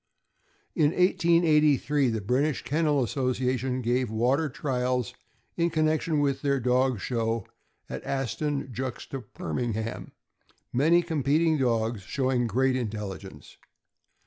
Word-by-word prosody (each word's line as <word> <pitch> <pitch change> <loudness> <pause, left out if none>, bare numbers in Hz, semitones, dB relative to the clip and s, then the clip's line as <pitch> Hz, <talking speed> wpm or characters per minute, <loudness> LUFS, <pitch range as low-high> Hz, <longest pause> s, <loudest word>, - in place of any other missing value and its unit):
In 155 -1 +2
1883, 155 -6 +3
the 110 -2 -2
British 130 +7 0
Kennel 145 +1 +1
Association 130 +1 -1
gave 120 +1 +1
water 125 +8 +1
trials 125 -3 -1 0.4
in 170 0 +2
connection 155 -1 +1
with 140 -2 0
their 140 -1 +1
dog 125 -1 +1
show 115 -1 -1 0.4
at - - -6
Aston 135 0 -2
juxta 130 +2 -5
Birmingham, 120 - -4 0.6
many 165 +7 +4
competing 160 0 +2
dogs 115 -3 0
show 130 +7 -1
ing 120 -2 +1
great 130 +4 +1
intelligence. 100 - -6
130 Hz, 110 wpm, -27 LUFS, 120-150 Hz, 0.6 s, many